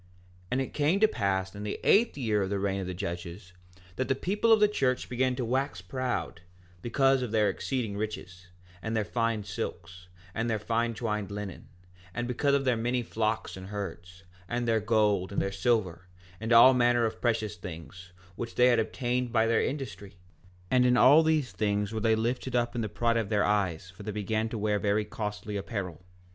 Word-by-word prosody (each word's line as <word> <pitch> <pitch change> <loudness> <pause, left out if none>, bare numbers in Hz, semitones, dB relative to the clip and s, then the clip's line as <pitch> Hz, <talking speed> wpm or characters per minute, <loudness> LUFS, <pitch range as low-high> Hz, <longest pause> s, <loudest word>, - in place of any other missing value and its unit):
4:6 90 - -28 0.5
And 130 - +1
it 135 - -5
came 155 +6 +2
to 220 - +6
pass 95 - -1
in 100 - -8
the 105 0 -4
eighth 225 -2 +4
year 110 -6 +1
of 95 - -1
the 100 - -1
reign 100 0 -1
of 95 - -5
the 90 - -4
judges, 85 0 -6 0.4
that 130 - -1
the 135 - +1
people 205 - +1
of 220 - +7
the 210 - +6
church 130 -11 0
began 125 +1 0
to 125 -1 -2
wax 130 -1 -1
proud, 120 -1 -3 0.4
because 135 +4 +2
of 125 - -2
their 105 -1 +2
exceeding 110 +1 -3
riches, 95 -4 -6 0.3
and 110 +3 -2
their 105 - 0
fine 115 -1 -1
silks, 90 -2 -6 0.3
and 115 +1 -1
their 110 - +1
fine 115 +2 -1
twined 105 -3 -2
linen, 100 -3 -7 0.5
and 120 0 -2
because 140 +3 +1
of 140 -1 0
their 125 -2 +3
many 120 +2 -1
flocks 110 -1 -2
and 95 0 -9
herds, 90 -2 -7 0.3
and 120 0 -1
their 115 -1 +3
gold 105 -3 +1
and 100 - -1
their 100 - -1
silver, 95 -4 0 0.3
and 110 +2 -4
all 120 +3 +9
manner 120 -1 +3
of 110 0 -4
precious 110 -3 0
things, 90 +1 -9 0.2
which 115 +3 -6
they 125 +1 +5
had 120 -2 +4
obtained 125 +2 -1
by 110 -1 +3
their 115 0 +2
industry; 100 - -5 0.6
and 125 -1 +5
in 125 0 +4
all 145 +6 +7
these 155 -5 +1
things 105 0 -1
were 110 - -2
they 110 +1 +3
lifted 125 +3 -2
up 120 -1 +1
in 120 - -2
the 110 - -2
pride 115 +2 +1
of 110 -3 -1
their 105 -1 +2
eyes, 95 -4 0
for 90 - -14
they 105 +1 -4
began 110 +2 -1
to 115 - -4
wear 105 0 0
very 105 +1 +1
costly 105 0 -5
apparel. 95 -5 -4
110 Hz, 205 wpm, -29 LUFS, 100-125 Hz, 0.6 s, all